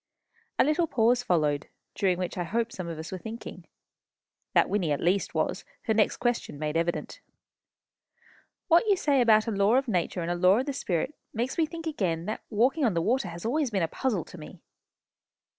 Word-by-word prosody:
A -, -, +6 dB
little 310 Hz, +4 st, +2 dB
pause 240 Hz, -2 st, +3 dB
followed, 150 Hz, -9 st, +1 dB, 0.3 s
during 185 Hz, -3 st, +1 dB
which 180 Hz, -1 st, -3 dB
I 180 Hz, -, -2 dB
hope 230 Hz, +6 st, -1 dB
some 185 Hz, -2 st, -6 dB
of 165 Hz, -2 st, -5 dB
us 160 Hz, +1 st, -7 dB
were 185 Hz, -, -5 dB
thinking. 225 Hz, +4 st, -8 dB, 0.9 s
That -, -, +5 dB
Wynnie, 185 Hz, -7 st, 0 dB
at 145 Hz, -, 0 dB
least, 185 Hz, +3 st, 0 dB
was, -, -, -1 dB, 0.2 s
her 220 Hz, -, +1 dB
next 215 Hz, -1 st, +2 dB
question 240 Hz, -, -1 dB
made 150 Hz, +1 st, -3 dB
evident. 170 Hz, +1 st, -2 dB, 1.5 s
"What 345 Hz, +4 st, +5 dB
you 400 Hz, -2 st, +4 dB
say 285 Hz, -6 st, +2 dB
about 220 Hz, -2 st, +5 dB
a 230 Hz, -, -2 dB
law 200 Hz, +3 st, +3 dB
of 270 Hz, +1 st, +2 dB
nature 180 Hz, -3 st, -1 dB
and 170 Hz, -, -2 dB
a -, -, 0 dB
law 180 Hz, +3 st, +5 dB
of 255 Hz, -, 0 dB
the 285 Hz, -, -2 dB
Spirit 200 Hz, -, -2 dB, 0.2 s
makes 240 Hz, +4 st, -1 dB
me 325 Hz, -2 st, +1 dB
think 330 Hz, +1 st, -8 dB
again 185 Hz, -, -1 dB
how 210 Hz, +6 st, -3 dB
that -, -, -10 dB
walking 255 Hz, +8 st, +2 dB
on 220 Hz, -8 st, +2 dB
the -, -, +2 dB
water 250 Hz, +3 st, +1 dB
has 170 Hz, +2 st, -8 dB
always 280 Hz, +3 st, +1 dB
been 195 Hz, -5 st, 0 dB
a -, -, +1 dB
puzzle 210 Hz, -1 st, -2 dB
to 180 Hz, -, -12 dB
me." 155 Hz, +3 st, -11 dB
215 Hz, 210 wpm, -28 LUFS, 175-255 Hz, 1.5 s, A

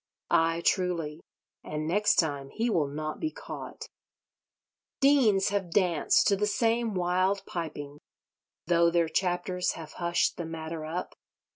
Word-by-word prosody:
Ay, 165 Hz, +1 st, +2 dB
truly: 170 Hz, -5 st, 0 dB, 0.4 s
and 155 Hz, 0 st, -4 dB
next 205 Hz, +5 st, +3 dB
time 145 Hz, -4 st, 0 dB
he 230 Hz, +9 st, -1 dB
will 155 Hz, -7 st, +2 dB
not 155 Hz, +2 st, -5 dB
be 315 Hz, -, -1 dB
caught. -, -, -8 dB, 1.1 s
Deans 255 Hz, -9 st, +4 dB
have 200 Hz, -3 st, -1 dB
danced 175 Hz, -4 st, +3 dB
to 200 Hz, -, +4 dB
the 210 Hz, +2 st, 0 dB
same 225 Hz, +1 st, +1 dB
wild 185 Hz, +2 st, +1 dB
piping, 145 Hz, -4 st, -6 dB, 0.7 s
though 170 Hz, 0 st, +4 dB
their 170 Hz, -1 st, +2 dB
chapters 180 Hz, 0 st, 0 dB
have 160 Hz, -2 st, -9 dB
hushed 170 Hz, 0 st, 0 dB
the 170 Hz, -, -4 dB
matter 160 Hz, -1 st, -5 dB
up. 175 Hz, +3 st, -4 dB
175 Hz, 135 wpm, -28 LUFS, 160-195 Hz, 1.1 s, Deans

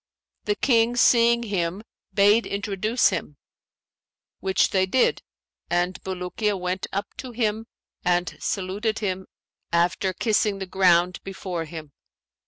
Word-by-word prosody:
The 210 Hz, -, +1 dB
King 235 Hz, +1 st, +2 dB
seeing 235 Hz, -1 st, +4 dB
him 190 Hz, -2 st, -2 dB, 0.3 s
bade 205 Hz, +3 st, +4 dB
introduce 205 Hz, +3 st, +1 dB
him, 145 Hz, -, -4 dB, 1.0 s
which 190 Hz, -1 st, +1 dB
they 190 Hz, -1 st, +2 dB
did; 255 Hz, +7 st, +2 dB, 0.5 s
and 175 Hz, +1 st, 0 dB
Bulukiya 190 Hz, +3 st, -2 dB
went 180 Hz, +1 st, -2 dB
up 200 Hz, +1 st, -4 dB
to 255 Hz, -2 st, -7 dB
him 225 Hz, -1 st, -1 dB, 0.4 s
and 175 Hz, 0 st, +1 dB
saluted 205 Hz, +3 st, -2 dB
him 190 Hz, -3 st, -3 dB, 0.4 s
after 175 Hz, +3 st, +1 dB
kissing 210 Hz, 0 st, +1 dB
the 195 Hz, -, -4 dB
ground 180 Hz, -1 st, +3 dB
before 185 Hz, -3 st, -5 dB
him. 155 Hz, -2 st, -9 dB
195 Hz, 120 wpm, -24 LUFS, 180-215 Hz, 1.0 s, seeing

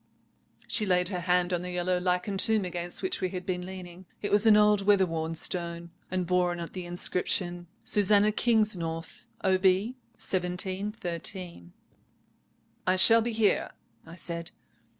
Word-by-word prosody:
"She 215 Hz, -, 0 dB
laid 180 Hz, -1 st, +2 dB
her 185 Hz, -3 st, -3 dB
hand 180 Hz, 0 st, +1 dB
on 175 Hz, -, -1 dB
the 180 Hz, -, -6 dB
yellow 180 Hz, 0 st, -1 dB
lichened 180 Hz, +2 st, -1 dB
tomb 215 Hz, -1 st, +5 dB
against 175 Hz, 0 st, -5 dB
which 370 Hz, -, -2 dB
we 185 Hz, -, 0 dB
had 180 Hz, -1 st, -6 dB
been 180 Hz, -2 st, -3 dB
leaning. 185 Hz, -1 st, -10 dB, 0.2 s
It 205 Hz, -, -2 dB
was 210 Hz, +2 st, +5 dB
an 210 Hz, -1 st, +7 dB
old 210 Hz, -1 st, +4 dB
weather 195 Hz, -1 st, +4 dB
worn 165 Hz, -1 st, -4 dB
stone, 170 Hz, 0 st, -2 dB, 0.2 s
and 185 Hz, -1 st, -2 dB
bore 180 Hz, 0 st, +1 dB
on 175 Hz, 0 st, -4 dB
it 170 Hz, -, -7 dB
the 180 Hz, -2 st, -6 dB
inscription— 175 Hz, 0 st, -1 dB, 0.2 s
'Susannah 205 Hz, +1 st, +5 dB
Kingsnorth, 200 Hz, -8 st, 0 dB, 0.2 s
Ob. 190 Hz, -1 st, +1 dB
1713.' 185 Hz, -, -2 dB, 1.1 s
"'I 185 Hz, -, +3 dB
shall 225 Hz, +5 st, +5 dB
be 235 Hz, +1 st, -2 dB
here.' 220 Hz, -2 st, +1 dB, 0.3 s
I 165 Hz, +1 st, -12 dB
said. 170 Hz, -1 st, -5 dB
180 Hz, 150 wpm, -28 LUFS, 175-200 Hz, 1.1 s, an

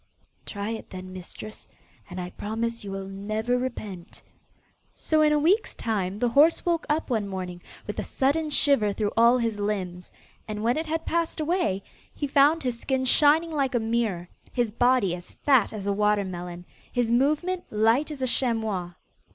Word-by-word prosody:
'Try 205 Hz, +1 st, -4 dB
it 225 Hz, -, -6 dB
then, 185 Hz, 0 st, -8 dB
mistress, 185 Hz, +4 st, -9 dB, 0.4 s
and 180 Hz, 0 st, -6 dB
I 180 Hz, 0 st, -5 dB
promise 230 Hz, +2 st, -3 dB
you 200 Hz, -, -7 dB
will 195 Hz, 0 st, -5 dB
never 215 Hz, +5 st, -2 dB
repent.' 215 Hz, -8 st, -5 dB, 0.7 s
So 315 Hz, -1 st, +1 dB
in 305 Hz, 0 st, +5 dB
a 300 Hz, -, +4 dB
week's 360 Hz, +9 st, +2 dB
time 200 Hz, -4 st, -2 dB
the 240 Hz, +2 st, +1 dB
horse 295 Hz, +7 st, +4 dB
woke 340 Hz, -2 st, 0 dB
up 300 Hz, -2 st, 0 dB
one 215 Hz, -4 st, 0 dB
morning 180 Hz, -2 st, -5 dB, 0.2 s
with -, -, -5 dB
a -, -, -1 dB
sudden 300 Hz, +4 st, 0 dB
shiver 280 Hz, -8 st, +4 dB
through 205 Hz, 0 st, -1 dB
all 235 Hz, +2 st, +6 dB
his 230 Hz, -3 st, -1 dB
limbs; 185 Hz, -4 st, -3 dB, 0.4 s
and 210 Hz, 0 st, -4 dB
when 240 Hz, +2 st, +2 dB
it 315 Hz, +1 st, -2 dB
had 320 Hz, +1 st, -2 dB
passed 335 Hz, -1 st, -1 dB
away, 300 Hz, -, 0 dB, 0.3 s
he 290 Hz, -, -2 dB
found 285 Hz, +3 st, +4 dB
his 245 Hz, -2 st, -2 dB
skin 265 Hz, 0 st, -1 dB
shining 305 Hz, +5 st, +4 dB
like 275 Hz, -4 st, 0 dB
a -, -, +3 dB
mirror, 220 Hz, -6 st, -1 dB, 0.2 s
his 240 Hz, -3 st, 0 dB
body 245 Hz, -5 st, +3 dB
as 175 Hz, 0 st, -8 dB
fat 265 Hz, -6 st, +3 dB
as 210 Hz, -3 st, -6 dB
a 200 Hz, -, +1 dB
water 210 Hz, 0 st, +2 dB
melon, 175 Hz, -1 st, -7 dB, 0.3 s
his 245 Hz, -2 st, 0 dB
movement 305 Hz, +9 st, +1 dB
light 225 Hz, +8 st, +2 dB
as 285 Hz, -4 st, -5 dB
a -, -, +1 dB
chamois. 220 Hz, -8 st, -1 dB
230 Hz, 180 wpm, -26 LUFS, 200-280 Hz, 0.7 s, all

